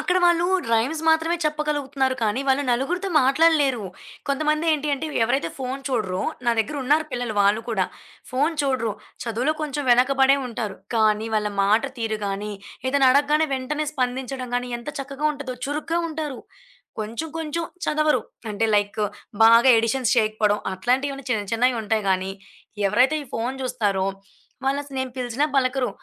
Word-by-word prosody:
అక్కడ 365 0 +1
వాళ్ళు 345 0 +4 0.3
రైమ్స్ 260 +8 +1
మాత్రమే 320 +2 +3
చెప్పగలుగుతున్నారు 290 -3 0
కానీ, 220 +4 +1
వాళ్ళు 270 +2 +3
నలుగురితో 350 +11 0
మాట్లాడలేరు. 275 -4 +3 0.4
కొంతమంది 305 +3 +1
ఏంటి 300 0 -1
అంటే, 295 +3 -5 0.2
ఎవరైతే 270 +5 0
ఫోను 265 +1 -4
చూడరో, 205 -8 -1 0.2
నా 240 - +3
దగ్గర 285 +7 0
ఉన్నారు 300 +4 +3
పిల్లలు 245 -3 -3
వాళ్ళు 205 +2 +3
కూడా, 195 -5 +1 0.5
ఫోను 290 +6 +1
చూడరు, 255 -6 0 0.3
చదువులో 240 +6 0
కొంచెం 290 -1 -2
వెనకబడే 270 +2 +5
ఉంటారు. 220 -4 -4 0.2
కానీ 215 0 +2
వాళ్ళ 210 -1 0
మాట 215 +5 +3 0.2
తీరు 220 -2 -2
గాని, 205 +1 -3 0.4
ఏదైనా 270 -1 +4
అడగగానే 295 +3 +3
వెంటనే 300 +4 -2
స్పందించడం 255 -1 -3
గాని, 245 0 -3
ఎంత 235 - -10
చక్కగా 275 +2 -3
ఉంటదో 275 -3 -6
చురుగ్గా 310 +4 -1
ఉంటారు. 305 -4 -5 0.6
కొంచెం 230 +10 -4
కొంచెం 325 +1 -3 0.2
చదవరు 300 -4 +2 0.3
అంటే, 225 +2 0
లైక్ 205 +1 -1 0.4
బాగా 230 +3 +7
ఎడిషన్స్ 230 +2 +1
చేయకపోవడం 215 -1 +1
అట్లాంటివి 270 +6 -1
చిన్న 215 -3 +1
చిన్నవి 245 0 +2
ఉంటాయి 215 -1 0
గానీ, 190 +1 0 0.6
ఎవరైతే 260 +9 +3
ఈ - - -17
ఫోను 245 +4 -2
జూస్తారో 205 -7 0 0.6
వాళ్ళు 275 +1 +2
అసలు 275 -2 -10
నేను 260 -1 -2
పిలిచినా 250 +4 0
పలకరు 255 -1 +2
260 Hz, 150 wpm, -23 LUFS, 225-295 Hz, 0.6 s, బాగా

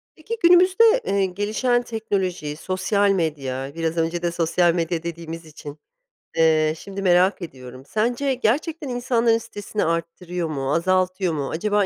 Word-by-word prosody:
Peki, 445 +9 -6
günümüzde, 365 +4 +6 0.2
eee, 200 -1 +1
gelişen 215 +6 0
teknoloji, 190 -9 -3
sosyal 190 +4 0
medya, 140 -7 -2
biraz 165 0 -2
önce 165 +1 0
de 175 -1 0
sosyal 170 +1 +2
medya 165 -1 -1
dediğimiz 165 0 -6
için, 150 -1 -10 0.6
eee, 155 -1 +3
şimdi 195 +3 -7
merak 185 +1 +3
ediyorum, 130 -5 -9
sence 240 - 0
gerçekten 285 +6 -1
insanların 240 -2 +2
stresini 205 -2 -4
arttırıyor 170 +1 -3
mu, 135 -2 -2
azaltıyor 185 +1 +1
mu, 140 -3 -3
acaba 205 +4 +1
180 Hz, 135 wpm, -22 LUFS, 165-215 Hz, 0.6 s, günümüzde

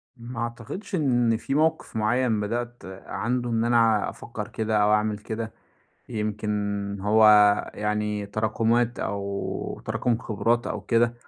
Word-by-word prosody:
ما 120 -1 -8
أعتقدش 120 - -5
إن 120 -7 +2
في 135 - -3
موقف 160 -5 +1
معيّن 110 +1 +1
بدأت 120 +3 -3 0.2
عنده 120 +4 -2
إن 115 -1 +1
أنا 115 -3 +3
أفكّر - - -7
كده 110 -1 -1
أو 105 +1 +4
أعمل 105 0 +1
كده. 110 +1 -5 0.6
يمكن 105 -1 -2 0.5
هو 110 +2 +5 0.5
يعني 105 0 -1
تراكُمات 115 +3 0
أو 100 0 -3
تراكُم 120 -2 0
خبرات 115 +2 0
أو - - -3
كده. 115 0 +2
115 Hz, 130 wpm, -25 LUFS, 105-120 Hz, 0.6 s, هو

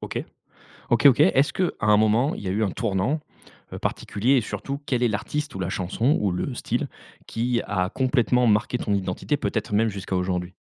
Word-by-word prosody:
OK. - - -4 0.7
OK, 120 +4 +4
OK. 135 0 +6
Est-ce 145 -4 +4
qu'à 185 - +1
un 105 0 +4
moment 110 +6 +3
il - - -8
y 95 - -4
a - - -1
eu 105 +4 0
un 100 - +1
tournant, 110 +9 -1 0.5
heu, - - -5
particulier? 120 +7 0
Et - - +4
surtout, 105 +7 -5
quel 125 -2 0
est 120 - +4
l'artiste 145 +8 -3
ou 95 - -5
la 90 - -2
chanson 105 - 0
ou 100 -3 +1
le 90 +9 -3
style - - -2 0.4
qui 120 +1 -1
a 95 -3 0
complètement 125 -1 +2
marqué 105 +3 +2
ton 105 - -1
identité, 100 +9 -1
peut-être 110 -6 -3
même 110 +2 +3
jusqu'à 95 -2 -4
aujourd'hui? 90 -1 -2
110 Hz, 200 wpm, -24 LUFS, 100-130 Hz, 0.7 s, OK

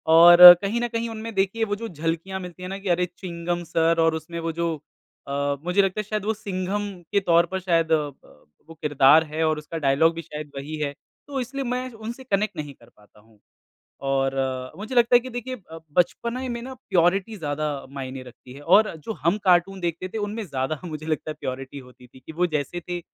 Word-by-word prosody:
और 175 +1 +12
कहीं 215 +4 -1
न 240 - 0
कहीं 230 0 -3
उनमें 225 0 -6
देखिए 195 +4 0
वो 205 - -2
जो 230 +2 -6
झलकियाँ 165 +3 -3
मिलती 180 0 -9
है 180 - -5
ना 195 - -4
कि 195 -2 -5
अरे 180 +1 +2
चिंघम 175 -1 -4
सिर 165 0 +1
और 160 - +2
उसमें 165 +2 -6
वो 165 0 -2
जो 170 0 -2 0.5
अ, 140 0 -1
मुझे 180 +3 +3
लगता 195 +1 -1
है 215 - -1
शायद 215 0 -4
वो 220 - +1
सिंघम 205 -1 -3 0.2
के 200 - +3
तौर 170 -2 +3
पर 190 - -1
शायद 165 -3 +1
अ, - - +7
ब 130 - -21 0.2
वो - - -9
किरदार 145 +1 +5
है 155 +1 -3
और 155 -1 +1
उसका 150 +2 -6
डायलॉग 155 +2 +3
भी 165 - -4
शायद 150 -2 -8
वही 140 +3 -5
है। 145 -2 -2 0.3
तो 280 -2 -3
इसलिए 270 +3 -4
मैं 250 0 -3
उनसे 225 +4 -8
कनेक्ट 210 -4 -1
नहीं 150 -2 -5
कर 120 -3 -21
पाता 105 0 -24
हूँ। 110 0 -25 0.7
और 135 0 +1
अ, 130 -1 -2
मुझे 220 +6 -6
लगता 240 0 +5
है 245 - +8
कि 255 - -9
देखिए 245 +1 -5 0.2
अब 165 0 -10
बचपने 235 +8 0
में 235 -1 -4
ना 260 +2 -7 0.2
प्योरिटी 185 +5 +2
ज़्यादा 155 -3 -3 0.3
मायने 135 -1 -6
रखती 125 0 -14
है 140 - -12
और 195 +6 +4
जो 225 - -3
हम 170 +6 +2
कार्टून 185 +1 +3
देखते 175 +1 -3
थे 220 - -6
उनमें 210 +1 -3
ज़्यादा 140 -1 -3
मुझे 155 -2 -6
लगता 155 0 -2
है - - -8
प्योरिटी 130 +2 -6
होती 125 0 -17
थी 130 - -17
कि 130 - -11
वो 175 +3 +1
जैसे 150 +5 -4
थे 175 0 -2
170 Hz, 225 wpm, -24 LUFS, 150-205 Hz, 0.7 s, और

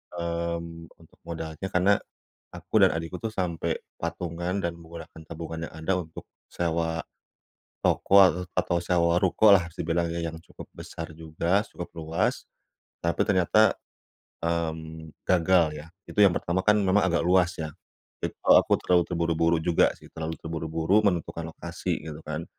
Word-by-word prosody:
Mmm, 85 -1 -4
untuk 80 - -22
modalnya 80 +2 -5
karena 95 +1 +3 0.6
aku - - -13
dan - - -1
adikku 80 +2 -4
tuh 115 - -3
sampai 90 -5 -2 0.2
patungan 85 +2 -3
dan 85 0 -2
menggunakan 80 -1 -11
tabungan 80 0 -6
yang - - -16
ada 80 +4 -1
untuk 80 -2 -8 0.3
sewa 80 -1 -1 0.8
toko 100 - +4 0.4
atau 90 -1 +1
sewa 85 0 +2
ruko 100 +3 +5
lah 95 -3 +3
bisa - - -5
dibilang 85 +1 0
ya, 85 +1 -3
yang 80 - -9
cukup - - -12
besar 80 -1 -8
juga, 80 +5 0
cukup 85 - -6
luas 80 +1 -1 0.6
tapi 85 0 0
ternyata, 105 +2 +4 0.7
mmm, 80 -1 -3 0.2
gagal 85 -2 +3
ya. 75 - -10 0.2
Itu - - -2
yang 95 -4 +6
pertama 85 +2 0
kan 105 0 +6
memang 100 0 +3
agak 85 -2 +1
luas 90 -1 +3
ya, 80 -2 -4 0.5
itu - - -3
aku - - +6
terlalu 90 -1 +3
terburu-buru 85 0 +1
juga 85 0 +4
sih, - - -15
terlalu 80 0 -4
terburu-buru 80 +4 0
menentukan 85 -4 -1
lokasi - - -4
gitu 75 -1 -7
kan. 75 +2 -4
85 Hz, 150 wpm, -26 LUFS, 80-90 Hz, 0.8 s, yang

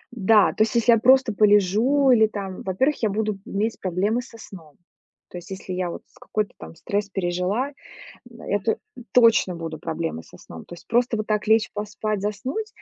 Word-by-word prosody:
да, 210 -1 +4
то - - -3
есть, 220 +2 +2
если 235 0 +4
я 230 - +5
просто 260 -1 +4
полежу 215 +7 +3
или 220 -3 +5
там, 195 -3 -6
во-первых, 260 +11 0
я 220 - +2
буду 210 0 -2
иметь 215 +3 -2
проблемы 195 +6 -1
со 230 -1 -14
сном. 165 -9 -13 0.5
То 180 - -9
есть, 175 - -15
если 190 -1 -7
я 180 -1 -2
вот - - -8
с - - -25
какой-то 215 -1 -3 0.2
стресс 205 0 -3
пережила, 190 +8 -2 0.6
н 230 -1 -15
эту 205 +2 -1 0.3
точно 230 -7 +4
будут 165 -2 -7
проблемы 160 - -4
со - - -17
сном. 80 - -12
То - - -12
есть, - - -17
просто 240 0 +1
вот 215 - -3
так 210 -1 -1
лечь, 220 0 +3
поспать, 210 0 -3
заснуть 255 - -3
210 Hz, 185 wpm, -23 LUFS, 190-230 Hz, 0.6 s, я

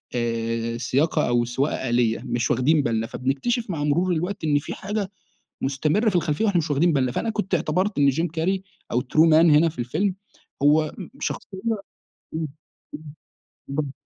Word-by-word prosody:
آآ، 115 0 -1
سياقة 135 +6 +1
أو 120 0 +2
سواقة 130 +1 -1
آلية، 120 -2 +2
مش 120 0 0
واخدين 145 +5 +3
بالنا، 115 -2 0
فبنكتشف 140 - -1
مع 160 -5 -2
مرور 170 +5 +2
الوقت 175 +2 -2
إن 145 -2 +3
في 145 - -6
حاجة 205 0 -3 0.5
مستمرة 155 - +1
في 195 - +2
الخلفيّة 170 +3 0
وإحنا 200 -4 +2
مش 165 -1 -2
واخدين 160 +5 +3
بالنا، 130 -4 +1
فأنا 225 - -1
كنت 210 -3 -2
اعتبرت 185 +4 0
إن 140 -1 +5
جيم 160 +6 +1
كاري 175 +4 -1 0.3
أو 120 - +2
True 155 +6 +3
man - - +6 0.2
هنا 155 +3 +5
في 155 - -9
الفيلم 160 - 0 0.5
هو 155 +2 +4 0.3
شخصيّة 190 - -4
إمم، 225 -2 +1 0.6
امم، 160 0 -1 1.3
امم. 145 -3 -2
150 Hz, 165 wpm, -24 LUFS, 125-180 Hz, 1.3 s, man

